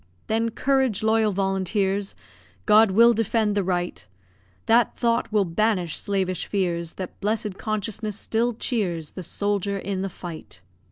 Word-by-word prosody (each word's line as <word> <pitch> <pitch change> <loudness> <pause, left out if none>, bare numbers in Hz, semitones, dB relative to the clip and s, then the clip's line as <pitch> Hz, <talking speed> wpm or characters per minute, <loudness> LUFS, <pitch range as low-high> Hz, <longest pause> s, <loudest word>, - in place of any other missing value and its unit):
Then, 225 +1 0
courage, 260 -3 +1
loyal 220 -1 +3
volunteers! 195 +1 0 0.5
God 215 0 +6
will 230 +5 +6
defend 220 -1 +1
the 200 -1 +1
right; 175 -1 -2 0.6
That 230 0 +3
thought 235 -1 +1
will 210 -2 +3
banish 180 -1 0
slavish 190 -3 -1
fears, 170 -4 -2
That 185 -2 -7
blessed 210 -1 -2
consciousness 215 -1 -3
still 235 +2 0
cheers 180 - -2
The 185 - -7
soldier 200 +2 -1
in 195 -1 -3
the 195 - -2
fight. 165 - -9
205 Hz, 135 wpm, -24 LUFS, 185-225 Hz, 0.6 s, God